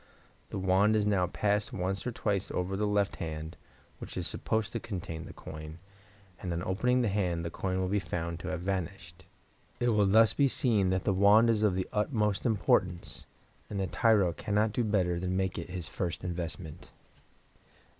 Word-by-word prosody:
The - - -4
wand 95 +3 +3
is 105 -1 +2
now 95 -4 +2
passed 105 +3 0
once 95 +4 -2
or - - -1
twice 100 -4 -1
over 90 +2 -2
the 105 +2 0
left 105 -1 +1
hand, 80 0 -5 0.4
which - - -7
is - - -2
supposed 110 0 -1
to 115 - -1
contain 85 -6 -6
the - - -9
coin, 75 0 -9 0.6
and 90 - -3
on 85 +1 -2
opening 125 +8 +1
the - - +2
hand 90 -5 0
the 85 - -3
coin 95 +1 -2
will 95 - 0
be 100 +2 +1
found 85 -2 -4
to - - -7
have 80 +2 -3
vanished. 95 -1 -4 0.5
It 120 - +2
will 105 -3 +3
thus 110 +1 +5
be 140 - +3
seen 110 -7 +2
that 95 0 0
the 100 - +2
wand 105 +4 +6
is 110 -2 +1
of 105 -4 +3
the 95 0 -1
utmost 105 0 +1
importance, 90 -5 0 0.4
and 100 - -3
the 95 - +1
tyro 100 -2 +3
cannot 105 +4 0
do 120 - +1
better 90 -5 +1
than 90 +1 -1
make 95 -1 -1
it 85 - -7
his 90 -3 -4
first 85 +1 -3
investment. 85 -2 -5
95 Hz, 190 wpm, -30 LUFS, 90-105 Hz, 0.6 s, wand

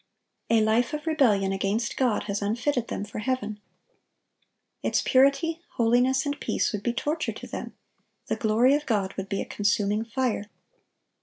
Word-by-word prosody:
A 230 -1 +4
life 225 +5 +2
of 300 - -6
rebellion 230 -12 +3
against 200 +4 -1
God 250 -5 +1
has 205 0 -3
unfitted 235 +4 0
them 205 - -4
for 205 - -7
heaven. 215 -3 -2 1.2
Its - - +1
purity, 280 +5 +3
holiness, 250 +4 +2
and 285 0 -2
peace - - 0
would 205 - -2
be 235 - 0
torture 295 +6 -2
to - - -9
them; - - -7 0.5
the - - -1
glory 230 +4 +3
of 295 +1 0
God 200 -4 0
would 195 0 -6
be 195 - -1
a - - -4
consuming 210 +1 0
fire. 230 -3 -2
230 Hz, 160 wpm, -26 LUFS, 210-265 Hz, 1.2 s, A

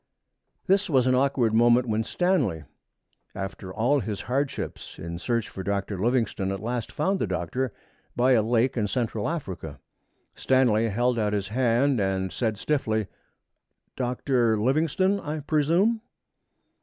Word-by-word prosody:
That 195 0 +2
was 130 -5 +3
an 130 - +3
awkward 130 -3 +2
moment 120 +2 +4
when 110 0 0
Stanley, 130 - 0 0.7
after 95 -1 -6
all 120 +8 +2
his 105 -3 -4
hardships 135 +3 -3
in 85 +2 -6
his 85 - -7
search 115 -3 -1
for 95 - -7
Dr. 100 0 -2
Livingstone, 115 -4 0
at 95 - -3
last 120 +2 -3
found 190 +6 0
the - - 0
Doctor 130 -1 -2 0.4
by 125 +2 +3
a 120 -4 +5
lake 120 +3 +1
in 110 -4 0
Central 110 -2 -1
Africa. 90 - -5 0.5
Stanley 115 -4 +2
held 120 +3 +1
out 105 -1 0
his 100 -1 -2
hand 125 +2 +2
and 95 -1 -1
said 110 -3 -1
stiffly, 110 -5 0 0.9
'Dr. 125 -3 +1
Livingstone, 160 - +1
I 155 -2 -4
presume?' 165 +10 +2
120 Hz, 145 wpm, -26 LUFS, 105-135 Hz, 0.9 s, a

